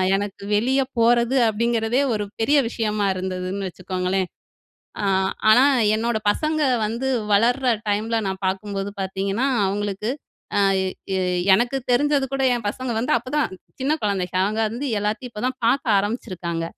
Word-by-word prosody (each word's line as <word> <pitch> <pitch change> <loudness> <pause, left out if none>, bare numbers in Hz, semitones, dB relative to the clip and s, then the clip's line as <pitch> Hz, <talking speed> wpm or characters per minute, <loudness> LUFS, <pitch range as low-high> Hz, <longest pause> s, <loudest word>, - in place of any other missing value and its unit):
எனக்கு 200 0 -4
வெளிய 260 +6 +2 0.2
போறது 235 +2 +3
அப்பிடிங்கிறதே 230 +3 +1
ஒரு 210 -1 -1 0.2
பெரிய 280 +7 +3
விஷயமா 215 -3 -1
இருந்ததுன்னு 185 +1 -3
வச்சுக்கோங்களேன். 185 +1 -2 0.8
அ - - 0 0.5
ஆனா, 245 +5 +7 0.3
என்னோட 230 0 0
பசங்க 310 +6 -1 0.3
வந்து 235 +5 -2 0.2
வளர்ற 240 +6 +3 0.2
டைம்ல 220 +3 0
நான் 190 +1 -5
பார்க்கும்போது 195 +1 -3
பார்த்தீங்கன்னா, 195 +5 -1 0.2
அவுங்களுக்கு, 205 +2 -2 0.5
ஆ - - +4 0.2
எ - - -1 0.7
எனக்கு 240 +4 0 0.2
தெரிஞ்சது 285 +2 +2
கூட 270 - -1
என் 230 - -6
பசங்க 255 +4 -4
வந்து 245 - +1
அப்பதான் 265 +5 -1 0.3
சின்ன 280 +3 +1
குழந்தைங்க. 185 -3 -1
அவுங்க 215 +3 -1
வந்து 255 +6 -4
எல்லாத்தையும் 220 +4 -3
இப்ப 210 +2 -5
தான் 260 - -6
பார்க்க 235 -3 +3
ஆரம்பிச்சிருக்காங்க. 180 -6 -3
215 Hz, 135 wpm, -22 LUFS, 195-245 Hz, 0.8 s, ஆனா